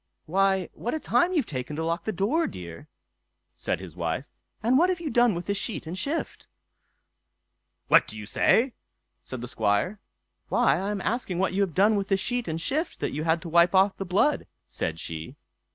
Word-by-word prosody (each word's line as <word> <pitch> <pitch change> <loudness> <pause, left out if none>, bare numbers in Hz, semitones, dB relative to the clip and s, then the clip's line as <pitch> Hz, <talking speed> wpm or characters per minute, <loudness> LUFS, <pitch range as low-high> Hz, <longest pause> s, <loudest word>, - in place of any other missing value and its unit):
"Why! 190 +1 +2
what 240 - -3
a - - -2
time 350 +3 +2
you've 315 -9 +1
taken 130 - -5
to 160 - -2
lock 170 +2 -2
the 220 - 0
door, 220 - +1
dear!" 85 -2 -9 0.7
said - - -2
his 95 -4 -10
wife; 85 - -2 0.4
"and 240 +3 +3
what 345 +7 +5
have 365 -2 0
you 325 -3 -4
done 240 -3 +4
with 175 - -4
the 200 - 0
sheet 200 0 -3
and 165 +3 -5
shift?" 280 - -3 1.4
"What - - +6
do 110 - -6
you 105 - -7
say?" 235 - +3 0.5
said 130 -2 -7
the 125 - -5
Squire. 110 - 0 0.5
"Why, 135 +4 +3
I 195 +2 -2
am 205 -2 -2
asking 215 -5 -2
what 190 +1 +1
you 200 - +1
have 190 -6 0
done 205 +4 +4
with 195 -1 -2
the 195 - +2
sheet 245 +4 -2
and 160 0 -2
shift 305 - -2
that - - -2
you 150 +3 -3
had 165 0 +1
to 170 - -6
wipe 170 +3 +4
off 190 +1 +4
the - - -3
blood", 195 +11 +1 0.2
said 80 0 -4
she. 80 -1 -6
190 Hz, 205 wpm, -26 LUFS, 150-230 Hz, 1.4 s, What